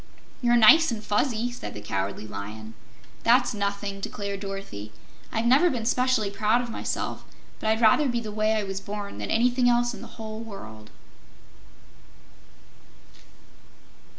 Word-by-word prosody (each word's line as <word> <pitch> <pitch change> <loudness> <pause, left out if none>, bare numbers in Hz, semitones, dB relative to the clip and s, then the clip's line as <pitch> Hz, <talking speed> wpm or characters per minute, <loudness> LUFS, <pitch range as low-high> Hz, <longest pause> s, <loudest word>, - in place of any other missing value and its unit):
"You're 240 -1 +4
nice 320 +9 +7
and 220 -3 -4
fuzzy," 230 +2 0
said 245 - -7
the - - -6
Cowardly 100 0 -3
Lion. 110 +1 -7 0.5
"That's 245 +1 +4
nothing," 200 -1 -3
declared 200 0 -4
Dorothy. 195 - -7 0.4
"I've 225 +1 -1
never 275 +9 +5
been 240 -7 -3
'specially 250 -4 +1
proud 215 +3 +2
of 240 -1 -4
myself, - - -3 0.4
but 220 - -1
I'd 220 +1 +1
rather 235 +6 +5
be 240 -1 0
the 220 -2 -6
way 215 +1 +1
I 215 - 0
was 195 -1 -4
born 200 - -6
than 105 - -4
anything 245 +2 +3
else 240 0 +2
in - - -9
the - - -8
whole 220 -1 -6
world." 110 - -10
215 Hz, 150 wpm, -26 LUFS, 195-240 Hz, 0.5 s, nice